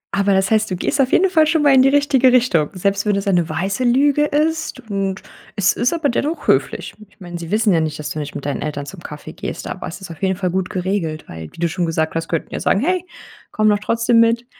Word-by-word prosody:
Aber 200 0 +2
das 190 +1 +1
heißt, 215 -1 +2
du 185 - -2
gehst 230 +9 0
auf 260 - +1
jeden 385 - +4
Fall 315 -3 +4
schon 320 -1 +2
mal 285 -2 +5
in 260 - +6
die 270 - +5
richtige 275 -2 +3
Richtung. 230 -12 +3
Selbst 200 +2 0
wenn 205 - +2
das 200 +1 -2
eine 175 -4 +2
weiße 195 +8 -2
Lüge 280 +4 +3
ist. 310 0 -1
Und 195 -1 -2 0.3
es 190 -2 +2
ist 240 - 0
aber 325 -3 0
dennoch 295 +7 -2
höflich. - - 0 0.2
Ich - - -29
meine, 175 -2 -7
sie 165 -1 -7
wissen 215 0 +2
ja 165 - +3
nicht, 155 -1 -2
dass 150 -1 -6
du 155 - -4
nicht 145 -1 -6
mit 140 - -6
deinen 145 - -2
Eltern 145 -2 -4
zum 190 +5 -10
Kaffee 150 -3 -9
gehst, - - -6
aber - - -6
es 165 +5 -8
ist 190 - -8
auf 165 - -11
jeden 190 -1 +1
Fall 180 -1 -2
gut 185 0 -1
geregelt, 180 -4 -2
weil, 80 -1 -9
wie - - -17
du 170 - +1
schon 175 +1 -2
gesagt 160 -1 -1
hast, 165 0 -3
könnten 165 - -3
ja - - -3
sagen: - - +2
„Hey, 360 +5 0 0.5
komm 215 0 +1
doch 205 -1 +2
trotzdem 230 +2 +2
mit.“ 230 +1 +3
200 Hz, 265 wpm, -19 LUFS, 170-255 Hz, 0.5 s, in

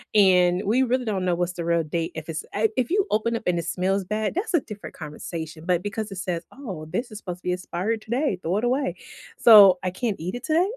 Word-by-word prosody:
and, 180 -2 +5
we 235 +6 +3
really 250 0 0
don't 195 -4 -1
know 175 -1 +2
what's 175 0 -1
the 170 - -5
real 170 -1 +2
date 165 +2 -3
if 160 0 -7
it's 160 0 -3
eh 220 +2 +2
if 250 -2 0
you 400 0 +3
open 230 +2 +1
up 225 - -4
and 175 -1 +1
it - - -4
smells 190 +2 0
bad, 210 +2 -2
that's 375 +3 -3
a - - +5
different 210 -2 -9
conversation, 160 +1 -7
but 180 0 +1
because 210 0 -4
it - - -6
says, 175 -2 -3
"Oh, 190 - -7
this 235 +6 -3
is 215 - -7
supposed 180 -2 -6
to - - -34
be 180 - 0
expired 185 +5 -3
today, 235 - -1
throw 180 +5 -1
it 220 - -2
away." 265 +3 0 0.4
So, 200 -5 +9
I 185 - -1
can't 215 -1 -2
eat 180 +4 -4
it 245 - -7
today? 345 +6 +2
195 Hz, 250 wpm, -24 LUFS, 175-230 Hz, 0.4 s, So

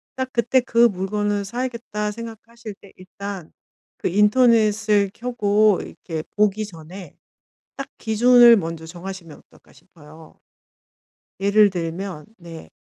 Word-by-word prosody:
딱 260 0 -3
그때 240 +2 +2
'그 235 0 +3
물건을 205 +1 -2
사야겠다.' 235 -2 -4
생각하실 230 0 -10
때 200 - -16
일단 190 -1 -9 0.5
그 - - -2
인터넷을 210 -1 +3
켜고 215 -4 +1
이렇게 160 -2 -7
보기 210 0 +1
전에 175 -1 -12 0.6
'딱 275 - -6
기준을 240 +2 +6
먼저 165 -3 -5
정하시면 175 -2 -9
어떨까.' - - -24
싶어요. 155 -2 -18 1.0
예를 200 +1 +4
들면 170 -1 -5
네. 170 -2 -12
205 Hz, 250 characters per minute, -21 LUFS, 180-230 Hz, 1.0 s, 기준을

